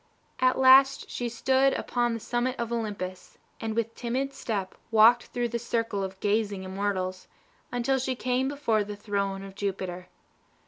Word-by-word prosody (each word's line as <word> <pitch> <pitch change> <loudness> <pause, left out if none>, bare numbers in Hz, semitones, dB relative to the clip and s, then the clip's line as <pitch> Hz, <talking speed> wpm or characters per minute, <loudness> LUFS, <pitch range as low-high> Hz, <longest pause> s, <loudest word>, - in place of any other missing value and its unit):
At 255 0 +3
last 265 +1 +6
she 240 -1 -2
stood 265 +3 +2
upon 240 -1 0
the - - -4
summit 245 +3 -1
of 235 0 -3
Olympus, 205 -5 -5 0.2
and 220 -1 -3
with 230 0 -1
timid 260 +3 -2
step 200 -8 -3 0.2
walked 230 +2 +6
through 240 -1 -2
the 235 +1 -2
circle 230 -3 -1
of 190 0 -6
gazing 205 -2 0
immortals, 185 -1 -3 0.4
until 245 +2 +1
she 255 0 -1
came 255 +1 0
before 235 -7 +1
the 205 0 -6
throne 200 -2 -2
of 195 -1 -9
Jupiter. 185 -2 -4
230 Hz, 155 wpm, -27 LUFS, 200-245 Hz, 0.4 s, last